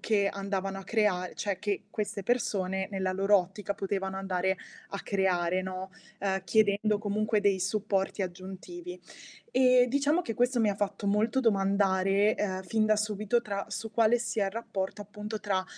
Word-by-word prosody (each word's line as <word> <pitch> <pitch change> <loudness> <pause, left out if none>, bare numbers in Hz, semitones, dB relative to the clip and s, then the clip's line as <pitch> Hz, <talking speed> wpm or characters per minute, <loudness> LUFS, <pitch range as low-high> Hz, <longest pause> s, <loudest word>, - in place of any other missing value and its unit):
che 205 -3 +2
andavano 195 -1 -3
a 195 - -7
crea 195 -5 +1
cioè 200 -3 -2
che 205 -1 -2
queste 205 -2 -3
persone 190 -5 0
nella 190 -2 -1
loro 195 +2 +4
ottica 190 +2 -4
potevano 195 -1 -2
andare 190 0 0 0.3
a 200 - -5
creare, 185 -2 +1
no, 185 0 -5 0.3
uhm, 195 -1 0
chiedendo 210 +2 +3
comunque 215 +1 0
dei 200 -2 +2
supporti 195 0 0
aggiuntivi. 190 - -7 0.5
Ehm, 255 -1 +5
diciamo 285 +6 +2
che, 225 - -4
questo 245 +2 +2
mi 220 -3 +3
ha - - -2
fatto 200 0 -2
molto 215 +5 +2
domandare, 195 -2 +3
uhm, 190 -2 -2
fin 215 +4 +1
da 215 0 +4
subito 215 +2 0
tra 200 -3 -4
su 225 0 -5
quale 230 +2 +4
sia 225 -3 -1
il - - -2
rapporto, 205 -3 -4
appunto, 210 +1 -6
tra 195 -3 -1
200 Hz, 165 wpm, -29 LUFS, 190-215 Hz, 0.5 s, Ehm